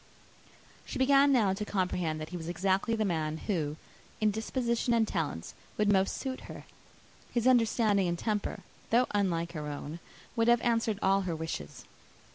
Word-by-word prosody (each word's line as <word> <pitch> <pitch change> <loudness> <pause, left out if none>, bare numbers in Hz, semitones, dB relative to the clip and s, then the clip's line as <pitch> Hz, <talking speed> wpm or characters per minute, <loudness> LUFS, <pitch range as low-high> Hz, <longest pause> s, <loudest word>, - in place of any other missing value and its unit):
She - - -6
began 275 +1 +5
now 215 -8 +3
to 205 +2 -3
comprehend 180 -5 -1
that 155 - -6
he 180 - -7
was 165 0 -6
exactly 190 +5 +1
the 220 -1 0
man 160 -4 -1
who, 160 -6 -2 0.4
in 215 -1 +3
disposition 235 +2 0
and 225 -1 +3
talents, 150 - -3 0.2
would 210 -1 +3
most 190 0 +2
suit 260 -1 -4
her. - - -8 0.7
His 235 -1 0
understanding 225 -5 +3
and 170 0 -1
temper, 210 +1 -2 0.3
though 240 +2 +4
unlike 170 -5 0
her 155 -3 -5
own, 150 +2 -6 0.4
would 230 0 +2
have 240 -1 +5
answered 230 -3 +1
all 195 +1 +4
her 180 -3 -2
wishes. 160 - -6
200 Hz, 165 wpm, -30 LUFS, 170-230 Hz, 0.7 s, began